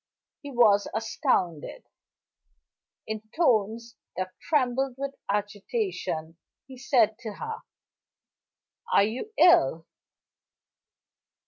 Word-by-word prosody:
He 285 Hz, -, -8 dB
was 220 Hz, -6 st, +4 dB
astounded. 185 Hz, -, -1 dB, 1.2 s
In 220 Hz, -1 st, -4 dB, 0.2 s
tones 230 Hz, -, +1 dB, 0.2 s
that 185 Hz, 0 st, -3 dB
trembled 265 Hz, -3 st, 0 dB
with 275 Hz, 0 st, -4 dB, 0.2 s
agitation, 205 Hz, -, -3 dB, 0.3 s
he 265 Hz, -, -12 dB
said 240 Hz, -4 st, +2 dB
to 220 Hz, -2 st, -6 dB
her: 450 Hz, -, -6 dB, 1.3 s
"Are -, -, +5 dB
you 240 Hz, -, -3 dB
ill?" 165 Hz, -, +5 dB
230 Hz, 85 wpm, -27 LUFS, 200-275 Hz, 1.3 s, Are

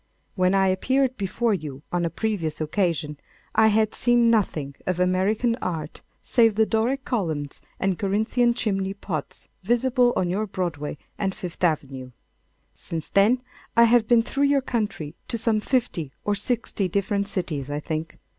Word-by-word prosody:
When 185 Hz, 0 st, +2 dB
I 195 Hz, -1 st, +4 dB
appeared 260 Hz, +7 st, +1 dB
before 215 Hz, +3 st, 0 dB
you 150 Hz, -6 st, -5 dB
on 175 Hz, -1 st, 0 dB
a -, -, 0 dB
previous 180 Hz, -7 st, -2 dB
occasion, 155 Hz, -3 st, -1 dB, 0.3 s
I 220 Hz, 0 st, +5 dB
had 215 Hz, 0 st, +2 dB
seen 240 Hz, -1 st, +3 dB
nothing 155 Hz, -10 st, 0 dB
of 180 Hz, -1 st, 0 dB
American 195 Hz, +6 st, +2 dB
art 160 Hz, -, -4 dB, 0.2 s
save 225 Hz, -3 st, +3 dB
the 220 Hz, +1 st, +4 dB
Doric 240 Hz, +5 st, 0 dB
columns 160 Hz, -, -2 dB, 0.2 s
and 190 Hz, -2 st, 0 dB
Corinthian 220 Hz, +4 st, +1 dB
chimney 195 Hz, -4 st, -1 dB
pots 165 Hz, -7 st, -5 dB
visible 245 Hz, +4 st, +3 dB
on 180 Hz, -, +1 dB
your 205 Hz, +5 st, -1 dB
Broadway 170 Hz, -7 st, -3 dB, 0.2 s
and 195 Hz, -2 st, -1 dB
Fifth 180 Hz, 0 st, -7 dB
Avenue. 135 Hz, -6 st, -1 dB, 0.6 s
Since 160 Hz, -2 st, -6 dB
then, 225 Hz, +6 st, +3 dB, 0.3 s
I 235 Hz, -, +8 dB
have 230 Hz, -1 st, +4 dB
been 235 Hz, -1 st, +5 dB
through 275 Hz, +4 st, 0 dB
your 280 Hz, -1 st, +3 dB
country 210 Hz, -, -3 dB
to 230 Hz, -, -2 dB
some 225 Hz, -1 st, +1 dB
fifty 215 Hz, -, -1 dB
or 205 Hz, -, +2 dB
sixty 205 Hz, -1 st, -1 dB
different 200 Hz, +2 st, 0 dB
cities, 170 Hz, -9 st, -3 dB
I 145 Hz, 0 st, -2 dB
think. 155 Hz, +1 st, -4 dB
195 Hz, 155 wpm, -24 LUFS, 165-230 Hz, 0.6 s, I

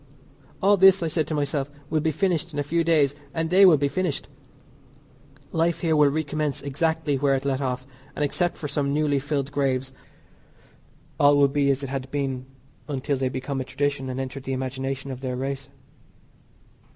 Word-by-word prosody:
All 200 Hz, +1 st, +5 dB
this, 190 Hz, -1 st, +6 dB
I -, -, 0 dB
said 160 Hz, 0 st, -1 dB
to 155 Hz, -, -2 dB
myself, 145 Hz, -1 st, -1 dB, 0.2 s
will 155 Hz, -, +2 dB
be 160 Hz, -, +1 dB
finished 170 Hz, -1 st, 0 dB
in -, -, -6 dB
a 145 Hz, -, +1 dB
few 165 Hz, +4 st, 0 dB
days, 155 Hz, -4 st, +3 dB, 0.2 s
and 160 Hz, 0 st, -1 dB
they 190 Hz, +1 st, +8 dB
will 165 Hz, -4 st, +7 dB
be 140 Hz, 0 st, +1 dB
finished; 175 Hz, -1 st, -2 dB, 1.2 s
life 165 Hz, 0 st, +1 dB
here 160 Hz, -2 st, +2 dB
will 150 Hz, -1 st, +5 dB
recommence 150 Hz, -1 st, -2 dB
exactly 150 Hz, +1 st, 0 dB
where 140 Hz, 0 st, +3 dB
it 135 Hz, +1 st, -3 dB
left 135 Hz, -1 st, 0 dB
off, 130 Hz, -1 st, -2 dB, 0.3 s
and 150 Hz, -, +1 dB
except 175 Hz, +5 st, -1 dB
for 150 Hz, -, -4 dB
some 140 Hz, 0 st, -1 dB
newly 150 Hz, -2 st, +2 dB
filled 140 Hz, 0 st, -2 dB
graves, 135 Hz, -2 st, -1 dB, 1.3 s
all 145 Hz, 0 st, +6 dB
will 140 Hz, -1 st, +6 dB
be 140 Hz, 0 st, +1 dB
as 140 Hz, 0 st, +1 dB
it 135 Hz, -, -4 dB
had 135 Hz, -1 st, -4 dB
been 135 Hz, -2 st, -3 dB, 0.4 s
until 140 Hz, -1 st, -1 dB
they 130 Hz, 0 st, 0 dB
become 130 Hz, +1 st, -3 dB
a -, -, -2 dB
tradition 140 Hz, 0 st, -2 dB
and 130 Hz, +1 st, -4 dB
enter 135 Hz, +1 st, -4 dB
the 135 Hz, 0 st, -4 dB
imagination 130 Hz, +1 st, -3 dB
of 130 Hz, 0 st, -7 dB
their 130 Hz, -2 st, -3 dB
race. 135 Hz, +1 st, -4 dB
140 Hz, 190 wpm, -25 LUFS, 135-155 Hz, 1.3 s, they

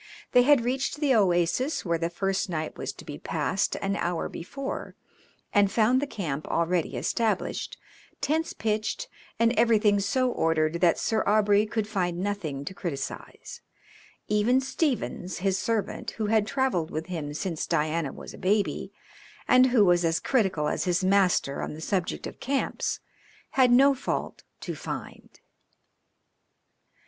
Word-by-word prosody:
They 250 Hz, -, +6 dB
had 255 Hz, -2 st, +4 dB
reached 260 Hz, +2 st, -1 dB
the 290 Hz, -3 st, +3 dB
oasis 195 Hz, -, +2 dB
where 170 Hz, -2 st, 0 dB
the 165 Hz, 0 st, -1 dB
first 195 Hz, +3 st, -1 dB
night 155 Hz, -2 st, -3 dB
was -, -, -4 dB
to -, -, -13 dB
be -, -, -7 dB
passed -, -, -1 dB
an 195 Hz, 0 st, 0 dB
hour 175 Hz, -1 st, -1 dB
before, 275 Hz, +11 st, -6 dB, 0.6 s
and 205 Hz, -2 st, +4 dB
found 240 Hz, +5 st, +3 dB
the 290 Hz, -, -2 dB
camp 155 Hz, -, -4 dB
already 170 Hz, 0 st, 0 dB
established, 225 Hz, -2 st, -1 dB, 0.4 s
tents 320 Hz, +3 st, 0 dB
pitched, 220 Hz, -, -2 dB, 0.3 s
and 230 Hz, +1 st, +3 dB
everything 215 Hz, -4 st, +4 dB
so 250 Hz, +6 st, +1 dB
ordered 160 Hz, -1 st, +1 dB
that 175 Hz, -2 st, +4 dB
Sir 220 Hz, -1 st, 0 dB
Aubrey 210 Hz, 0 st, +4 dB
could 210 Hz, 0 st, -2 dB
find 180 Hz, -5 st, -1 dB
nothing 175 Hz, -8 st, -3 dB
to 190 Hz, -, -5 dB
criticise; 165 Hz, -8 st, -6 dB, 0.7 s
even 210 Hz, +5 st, +3 dB
Stephens, 265 Hz, -, -2 dB
his 190 Hz, +1 st, 0 dB
servant, 220 Hz, +2 st, -2 dB
who 220 Hz, -, -1 dB
had 215 Hz, 0 st, +2 dB
travelled 230 Hz, -, 0 dB
with 160 Hz, 0 st, -4 dB
him 160 Hz, -5 st, -4 dB
since 165 Hz, -1 st, -3 dB
Diana 155 Hz, -1 st, 0 dB
was -, -, -10 dB
a -, -, -11 dB
baby, 195 Hz, -2 st, 0 dB, 0.6 s
and 255 Hz, 0 st, +6 dB
who 240 Hz, -5 st, +4 dB
was 175 Hz, -1 st, +4 dB
as 165 Hz, 0 st, +1 dB
critical 190 Hz, -, +1 dB
as -, -, -1 dB
his 180 Hz, 0 st, +1 dB
master 185 Hz, -7 st, +2 dB
on -, -, -4 dB
the -, -, -9 dB
subject 180 Hz, +2 st, -2 dB
of -, -, -8 dB
camps, 275 Hz, +1 st, -1 dB, 0.5 s
had 260 Hz, -2 st, +4 dB
no 270 Hz, +3 st, +6 dB
fault 260 Hz, -, -4 dB, 0.2 s
to -, -, -4 dB
find. -, -, -8 dB
200 Hz, 150 wpm, -27 LUFS, 170-235 Hz, 0.7 s, They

